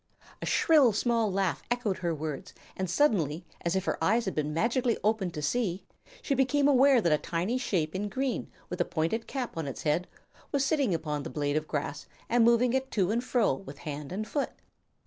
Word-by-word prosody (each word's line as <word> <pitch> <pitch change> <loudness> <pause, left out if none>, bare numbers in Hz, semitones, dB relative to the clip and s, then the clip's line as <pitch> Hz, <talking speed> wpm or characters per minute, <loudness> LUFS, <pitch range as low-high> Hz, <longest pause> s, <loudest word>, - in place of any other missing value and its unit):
A - - -4
shrill, 290 -8 +5
small 230 -1 +1
laugh 190 -2 0
echoed 240 -5 -1
her 175 -2 -1
words, 150 -2 -5 0.2
and 185 -1 -3
suddenly, 175 - +1 0.2
as 170 +2 0
if 190 -1 0
her - - -1
eyes 225 +4 +3
had 190 - -2
been 150 -1 -1
magically 235 - +1
opened 210 -4 +1
to 150 - -4
see, 190 +1 -1 0.4
she 280 - 0
became 275 +2 +3
aware 270 -2 +5
that 170 - +2
a 150 - +3
tiny 185 +9 -1
shape 165 -10 -1
in 205 +2 -2
green, 260 +3 -2 0.2
with 180 0 -3
a - - +2
pointed 175 +8 -1
cap 260 -3 -4
on 160 -3 -3
its 135 - -6
head, 160 +4 +1 0.4
was 280 -2 +1
sitting 270 - +2
upon 150 -2 -3
the - - -6
blade 145 -1 -1
of 155 0 -1
grass 145 -1 -3 0.2
and 240 0 +4
moving 235 +1 +4
it 265 0 0
to 195 -5 +1
and 235 +2 0
fro 240 - +2
with 140 -1 -8
hand 145 0 -6
and 215 +4 -3
foot. 285 +5 -1
195 Hz, 205 wpm, -29 LUFS, 160-245 Hz, 0.4 s, shrill